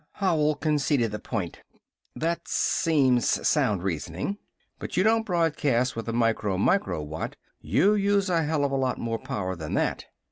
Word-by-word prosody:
Howell 155 Hz, -6 st, +1 dB
conceded 145 Hz, -5 st, +1 dB
the 105 Hz, -, -4 dB
point. 100 Hz, -8 st, -4 dB, 0.5 s
"That 170 Hz, +1 st, -2 dB
seems 135 Hz, -7 st, +2 dB, 0.2 s
sound 100 Hz, -4 st, +2 dB
reasoning." 95 Hz, -, -3 dB, 0.4 s
"But -, -, -6 dB
you 185 Hz, -, +4 dB
don't 225 Hz, +1 st, +2 dB
broadcast 145 Hz, -, +1 dB
with 115 Hz, 0 st, -4 dB
a -, -, 0 dB
micro 115 Hz, -4 st, +1 dB
micro 180 Hz, -, +1 dB
watt. 75 Hz, +2 st, -5 dB, 0.2 s
You 110 Hz, -, +3 dB
use 200 Hz, -1 st, +2 dB
a 170 Hz, -3 st, +2 dB
hell 150 Hz, -1 st, 0 dB
of 140 Hz, -, -1 dB
a -, -, 0 dB
lot 130 Hz, -1 st, 0 dB
more 115 Hz, -1 st, -3 dB
power 95 Hz, -2 st, -3 dB
than 80 Hz, -3 st, -5 dB
that! -, -, -1 dB
135 Hz, 165 wpm, -26 LUFS, 105-170 Hz, 0.5 s, you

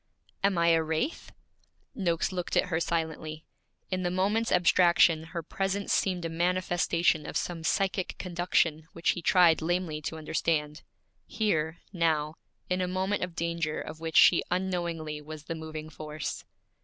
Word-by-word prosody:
'Am 200 Hz, -2 st, +2 dB
I 170 Hz, 0 st, +4 dB
a 165 Hz, -1 st, +4 dB
wraith?' 160 Hz, -, -2 dB, 0.6 s
Noakes 175 Hz, -3 st, 0 dB
looked 180 Hz, -2 st, -2 dB
at -, -, +2 dB
her 160 Hz, -2 st, 0 dB
silently. 160 Hz, -2 st, -3 dB, 0.5 s
In 185 Hz, 0 st, 0 dB
the 180 Hz, -, 0 dB
moment's 205 Hz, +5 st, +1 dB
abstraction 175 Hz, -2 st, +4 dB
her 165 Hz, 0 st, -5 dB
presence 195 Hz, +4 st, -2 dB
seemed 180 Hz, -3 st, 0 dB
a -, -, +1 dB
manifestation 175 Hz, -2 st, +1 dB
of -, -, -2 dB
some 170 Hz, -2 st, -3 dB
psychic 190 Hz, +2 st, 0 dB
conduction 170 Hz, -3 st, 0 dB
which 170 Hz, -, +1 dB
he 175 Hz, -, -5 dB
tried 170 Hz, -2 st, +5 dB
lamely 170 Hz, -2 st, -1 dB
to 160 Hz, +2 st, -5 dB
understand 155 Hz, -1 st, -1 dB, 0.5 s
here, 160 Hz, -7 st, 0 dB, 0.2 s
now, 160 Hz, -3 st, +1 dB, 0.3 s
in 180 Hz, 0 st, 0 dB
a 180 Hz, -, 0 dB
moment 190 Hz, +2 st, -1 dB
of 180 Hz, -2 st, -5 dB
danger 170 Hz, -2 st, -2 dB
of 160 Hz, -, -7 dB
which 165 Hz, 0 st, -1 dB
she 175 Hz, -, +7 dB
unknowingly 170 Hz, -4 st, -2 dB
was 155 Hz, 0 st, -9 dB
the 165 Hz, -, -4 dB
moving 155 Hz, -1 st, -7 dB
force. 155 Hz, -1 st, -6 dB
170 Hz, 155 wpm, -29 LUFS, 160-180 Hz, 0.6 s, she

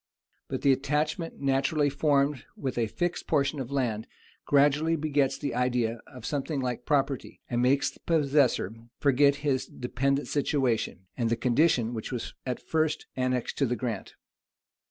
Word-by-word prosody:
But -, -, -4 dB
the 140 Hz, -, +6 dB
attachment, 150 Hz, +5 st, -1 dB
naturally 140 Hz, +2 st, +2 dB
formed 140 Hz, -2 st, +2 dB
with 130 Hz, -3 st, -3 dB
a 115 Hz, -, +1 dB
fixed 175 Hz, +9 st, -2 dB
portion 140 Hz, +1 st, +1 dB
of 130 Hz, -2 st, -4 dB
land, 120 Hz, -6 st, -1 dB, 0.4 s
gradually 145 Hz, +3 st, +4 dB
begets 145 Hz, -3 st, +1 dB
the 145 Hz, -, -3 dB
idea 120 Hz, -2 st, 0 dB
of 125 Hz, -4 st, -11 dB
something 145 Hz, 0 st, -2 dB
like 125 Hz, -2 st, -3 dB
property, 140 Hz, -3 st, 0 dB
and 120 Hz, -1 st, 0 dB
makes 135 Hz, +2 st, +3 dB
the -, -, -20 dB
possessor 140 Hz, -, +2 dB, 0.2 s
forget 140 Hz, 0 st, +4 dB
his 135 Hz, -3 st, +1 dB
dependent 135 Hz, +3 st, -1 dB
situation, 130 Hz, -9 st, 0 dB
and 115 Hz, -3 st, 0 dB
the 115 Hz, -, +2 dB
condition 120 Hz, -1 st, +2 dB
which 110 Hz, +1 st, -5 dB
was 125 Hz, -3 st, -4 dB
at 125 Hz, -, -2 dB
first 155 Hz, -1 st, 0 dB
annexed 130 Hz, -1 st, -1 dB
to 140 Hz, -, +3 dB
the 125 Hz, -, 0 dB
grant. 120 Hz, -3 st, -4 dB
135 Hz, 155 wpm, -28 LUFS, 125-145 Hz, 0.4 s, the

